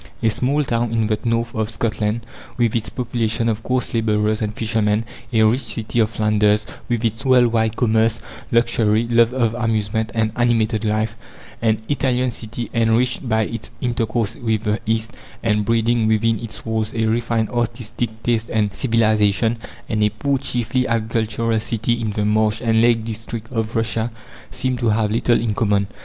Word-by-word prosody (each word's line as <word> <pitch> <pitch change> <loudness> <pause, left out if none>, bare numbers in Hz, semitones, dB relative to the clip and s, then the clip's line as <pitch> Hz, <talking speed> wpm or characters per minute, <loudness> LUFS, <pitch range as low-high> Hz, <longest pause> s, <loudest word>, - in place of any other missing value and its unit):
A 110 - +4
small 140 +6 +1
town 120 -3 -1
in 115 -1 +1
the 110 -1 0
north 115 0 0
of 110 -1 -1
Scotland, 110 0 -2 0.3
with 120 -3 +1
its 115 -2 -1
population 115 -2 -1
of 110 -1 0
coarse 125 0 -1
labourers 110 -1 +1
and 105 -1 -1
fishermen; 110 -1 0 0.3
a 110 -2 +4
rich 115 +5 +3
city 110 +1 -2
of 110 -2 +3
Flanders, 105 -1 +2 0.2
with 120 -1 0
its 110 0 -1
world 130 -2 +5
wide 110 -1 +1
commerce, 115 -1 +2 0.3
luxury, 115 -1 +2
love 115 0 +4
of 120 -3 +1
amusement 110 -2 -1
and 110 -1 +1
animated 115 -2 +1
life; 110 0 0 0.5
an 110 -2 +2
Italian 130 -3 +1
city 115 +1 -4
enriched 115 +3 +1
by 110 0 +2
its 115 0 -5
intercourse 115 -2 -1
with 110 -4 -1
the 105 -1 0
East, 110 +1 0 0.3
and 105 -2 +1
breeding 115 0 +2
within 110 0 +2
its 115 -4 -8
walls 110 0 -1
a 110 -1 +1
refined 115 0 0
artistic 115 -1 -3
taste 115 -1 0
and 105 -3 0
civilization; 110 -2 +2 0.3
and 110 -1 -1
a 105 - +4
poor, 135 +6 -1
chiefly 125 -1 -1
agricultural, 115 0 0
city 115 +1 -1
in 110 - -1
the 105 0 -1
marsh 105 0 +2
and 115 -2 +2
lake 115 -1 +3
district 115 0 -6
of 115 -1 -2
Russia, 115 0 0 0.4
seem 130 0 -1
to 120 -2 +1
have 105 0 +1
little 115 +1 +2
in 115 -2 -1
common. 100 -2 +1
115 Hz, 170 wpm, -20 LUFS, 110-120 Hz, 0.5 s, world